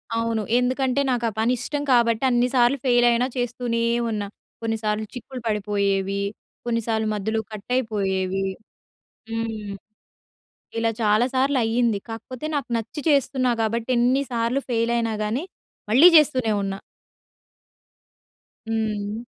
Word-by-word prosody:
అవును. 230 Hz, -1 st, 0 dB, 0.2 s
ఎందుకంటే 255 Hz, +2 st, +1 dB
నాకా 240 Hz, -2 st, 0 dB
పని 230 Hz, +3 st, +2 dB
ఇష్టం 290 Hz, +3 st, -3 dB
కాబట్టి 235 Hz, 0 st, +3 dB
అన్నిసార్లు 245 Hz, +2 st, +3 dB
ఫెయిల్ 245 Hz, -1 st, +4 dB
అయినా 235 Hz, +1 st, +2 dB
చేస్తూనే 240 Hz, -1 st, -1 dB, 0.3 s
ఉన్నా. 210 Hz, -2 st, -2 dB, 0.3 s
కొన్నిసార్లు 220 Hz, -1 st, -1 dB
చిక్కులు 255 Hz, 0 st, -8 dB
పడిపోయేవి 200 Hz, -2 st, 0 dB, 0.4 s
కొన్నిసార్లు 225 Hz, -2 st, 0 dB
మధ్యలో 220 Hz, +2 st, -1 dB
కట్ 210 Hz, -1 st, -9 dB
అయిపోయేవి. 195 Hz, -5 st, -1 dB, 0.9 s
హ్మ్. 220 Hz, -3 st, -4 dB, 1.1 s
ఇలా 225 Hz, 0 st, +1 dB
చాలా 215 Hz, +2 st, +3 dB
సార్లు 270 Hz, 0 st, +2 dB
అయింది. 225 Hz, -2 st, +1 dB
కాకపోతే 235 Hz, +5 st, -7 dB
నాకు 275 Hz, -4 st, -2 dB
నచ్చి 230 Hz, +7 st, -5 dB
చేస్తున్నా 265 Hz, -3 st, +2 dB
కాబట్టి 225 Hz, +2 st, -1 dB
ఎన్ని 255 Hz, +4 st, +3 dB
సార్లు 235 Hz, +3 st, 0 dB
ఫెయిల్ 230 Hz, 0 st, +1 dB
అయినా 230 Hz, -1 st, 0 dB
గానీ, 230 Hz, +9 st, -1 dB, 0.5 s
మళ్ళీ 280 Hz, +10 st, +8 dB
చేస్తూనే 260 Hz, -7 st, +3 dB
ఉన్నా. 195 Hz, 0 st, -3 dB, 1.9 s
హ్మ్. 215 Hz, -2 st, -2 dB
230 Hz, 115 wpm, -23 LUFS, 215-250 Hz, 1.9 s, మళ్ళీ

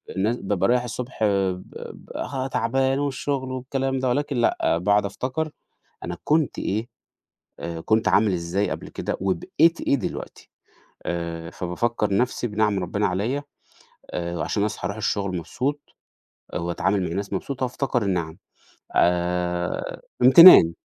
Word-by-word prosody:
الناس 110 Hz, +5 st, +1 dB
بابقى 100 Hz, -4 st, 0 dB
رايح 125 Hz, 0 st, +3 dB
الصبح 125 Hz, +2 st, -6 dB
آآ 100 Hz, -2 st, +2 dB
ب 90 Hz, 0 st, -7 dB, 0.3 s
ب -, -, -15 dB
ها 135 Hz, -2 st, -3 dB
تعبان 135 Hz, +2 st, +1 dB
والشغل 140 Hz, -1 st, -2 dB
والكلام 135 Hz, +1 st, -2 dB
ده 130 Hz, -1 st, 0 dB
ولكن 145 Hz, +1 st, -1 dB
لأ 115 Hz, -7 st, +2 dB
باقعد 100 Hz, +4 st, +2 dB
أفتكر 130 Hz, -, -3 dB, 0.6 s
أنا 85 Hz, 0 st, -4 dB
كنت 155 Hz, -1 st, +1 dB
إيه 110 Hz, +4 st, -2 dB, 0.7 s
آآ 85 Hz, -1 st, -5 dB
كنت 110 Hz, +4 st, +2 dB
عامل 100 Hz, +2 st, +4 dB
إزاي 90 Hz, +3 st, -1 dB
قبل -, -, -5 dB
كده، -, -, -4 dB
وبقيت 100 Hz, -, +2 dB
إيه -, -, +1 dB
دلوقتي، 125 Hz, -, -5 dB, 0.6 s
آآ 85 Hz, -1 st, -4 dB
فبافكّر 100 Hz, +3 st, -1 dB
نَفْسي 125 Hz, +1 st, 0 dB
بنِعَم 105 Hz, -2 st, +1 dB
ربّنا 100 Hz, +4 st, -1 dB
عليّا 110 Hz, +10 st, -1 dB, 0.7 s
آآ 85 Hz, 0 st, -3 dB
وعشان 100 Hz, +6 st, 0 dB
أصحى 105 Hz, -4 st, -3 dB
أروح 100 Hz, +3 st, -4 dB
الشغل 100 Hz, -3 st, -1 dB
مبسوط 140 Hz, -, -2 dB, 0.8 s
وأتعامل 95 Hz, +3 st, 0 dB
مع -, -, -1 dB
الناس 100 Hz, +3 st, -3 dB
مبسوط 130 Hz, +8 st, -4 dB
وأفتكر 125 Hz, -1 st, -1 dB
النِعَم 85 Hz, -5 st, -2 dB, 0.6 s
آآ 90 Hz, 0 st, 0 dB, 0.2 s
امْتِنان. 130 Hz, -, +10 dB
105 Hz, 140 wpm, -24 LUFS, 90-130 Hz, 0.8 s, امْتِنان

